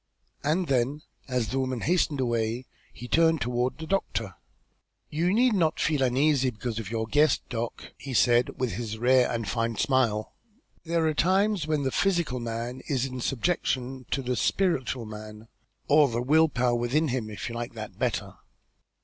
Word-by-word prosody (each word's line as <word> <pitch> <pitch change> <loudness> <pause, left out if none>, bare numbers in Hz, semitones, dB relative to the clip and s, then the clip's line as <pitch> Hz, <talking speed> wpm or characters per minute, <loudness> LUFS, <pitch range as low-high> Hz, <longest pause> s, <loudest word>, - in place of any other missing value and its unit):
And 160 +5 +1
then, 135 +1 0 0.2
as 125 -4 -1
the 135 - -1
woman 130 -3 -2
hastened 165 -4 +1
away, 120 0 -1 0.3
he 120 - -9
turned 165 +2 +3
toward 125 +1 -1
the 160 - -6
doctor. 115 - -2 0.8
"You 170 +4 +1
need 240 +3 +4
not 165 -5 +1
feel 150 -4 +1
uneasy 135 +1 +3
because 115 0 -4
of 105 -4 -6
your 110 -1 -2
guest, 150 +6 +3
Doc.," 115 -1 -5
he 135 -3 -5
said, 120 +1 +3
with 125 -2 0
his 110 -2 -4
rare 125 +2 +4
and 115 -3 -2
fine 115 +4 -1
smile. 115 -4 +1 0.5
"There 165 0 +1
are 155 - +2
times 190 +2 +2
when 155 -2 0
the 130 - 0
physical 170 -9 +1
man 120 +2 -4
is 135 -3 +1
in 130 -1 -5
subjection 130 -2 -1
to 135 - -1
the 125 0 -1
spiritual 130 - 0
man, 110 +1 -10 0.4
or 150 0 +6
the 120 -2 -2
will 160 +4 +4
power 125 -3 +1
within 125 +6 +1
him, 120 -4 -2
if 105 - -6
you 115 - -5
like 120 0 -5
that 110 -1 -8
better. - - -2
130 Hz, 175 wpm, -27 LUFS, 120-155 Hz, 0.8 s, or